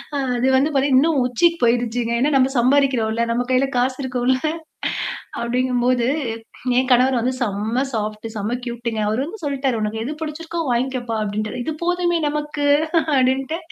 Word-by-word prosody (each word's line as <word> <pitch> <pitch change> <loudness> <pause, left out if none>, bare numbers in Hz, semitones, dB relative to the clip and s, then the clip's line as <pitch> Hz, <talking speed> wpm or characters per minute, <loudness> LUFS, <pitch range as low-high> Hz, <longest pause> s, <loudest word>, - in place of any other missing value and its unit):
அ - - 0 0.2
அது 245 +2 +1
வந்து 295 +4 +2
பாத்தீங்க 270 -1 +3
இன்னும் 305 -2 +2
உச்சிக்கு 335 +7 +2
போயுருச்சுங்க. 235 0 +1
ஏன்னா 285 +4 +2
நம்ம 265 0 +3
சம்பாரிக்கிறோம்ல. 245 -4 +2
நம்ம 245 +1 0
கையில 255 +2 +3
காசு 255 +1 +1
இருக்கும்ல 255 0 +1 1.1
அப்டிங்கும்போது, 245 0 +1 0.7
என் 255 0 +2
கணவர் 255 +1 +4
வந்து 255 +2 0
செம்ம 215 +2 -1
சாஃப்ட்டு, 215 0 -3
செம்ம 215 +4 -2
கியூட்டுங்க. 235 -2 -3
அவரு 215 +3 0
வந்து 365 +4 -9
சொல்ட்டாரு 270 -4 -1
உனக்கு 215 +1 -2
எது 270 - -4
புடிச்சிருக்கோ 325 +2 -5
வாங்கிக்கப்பா" 245 -1 -1
அப்டின்ட்டாரு. 215 +4 -3
இது - - -1
போதுமே 355 -1 +1
நமக்கு 295 0 -3 0.5
அப்டின்ட்டு. 265 +4 +1
255 Hz, 150 wpm, -21 LUFS, 235-275 Hz, 1.1 s, கணவர்